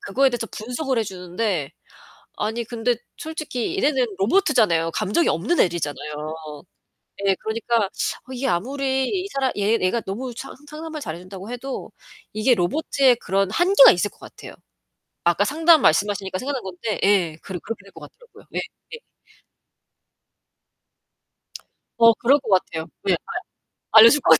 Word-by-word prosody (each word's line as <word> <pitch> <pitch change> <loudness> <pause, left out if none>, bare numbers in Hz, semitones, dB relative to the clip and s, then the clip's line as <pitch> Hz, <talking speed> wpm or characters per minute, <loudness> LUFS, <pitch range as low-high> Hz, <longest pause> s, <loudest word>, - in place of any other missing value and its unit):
그거에 265 +7 +2
대해서 240 -2 -3
분석을 250 +3 -3
해 225 - +1
주는데 180 -4 -3 0.7
아니 220 +3 -2
근데 235 +1 -1 0.2
솔직히 315 -1 -4
얘네는 260 - +1
로보트잖아요. 210 - +2
감정이 210 - +1
없는 215 - 0
애들이잖아요. 150 -2 -1 0.9
예. 195 - +4
그러니까 230 +2 -1
어 255 +6 -5
이게 260 +1 -3
아무리 265 +7 0
이 385 -1 -2
사람 265 -2 0
얘 210 +3 +2
얘가 185 +6 +1
너무 235 +5 -5
상 270 - -8
상담을 310 0 -7
잘 160 - -5
해 - - -11
준다고 190 +3 -10
해도 250 +2 -6 0.4
이게 215 +4 +3
로보트의 255 - +2
그런 195 -3 0
한계가 390 - +7
있을 - - -1
것 - - -25
같아요. - - -12 0.7
아까 175 +3 +3
상담 320 +5 +4
말씀하시니까 190 +2 +1
생각난 270 +1 -3
건데 190 +4 -4
예, 185 -6 +2
그러 190 -2 -6
그렇게 215 -4 -7
될 195 - -17
것 - - -13
같더라고요. 485 -1 -16
예예. 465 - -7 3.0
어, 230 0 +8
그럴 270 +6 +3
것 255 - -10
같아요. 165 -4 +1 0.2
왜 195 - +1 0.6
알 220 - +5
알려줄 235 +6 +8
것 - - +3
같아. 160 - +8
230 Hz, 325 characters per minute, -22 LUFS, 190-270 Hz, 3.0 s, 어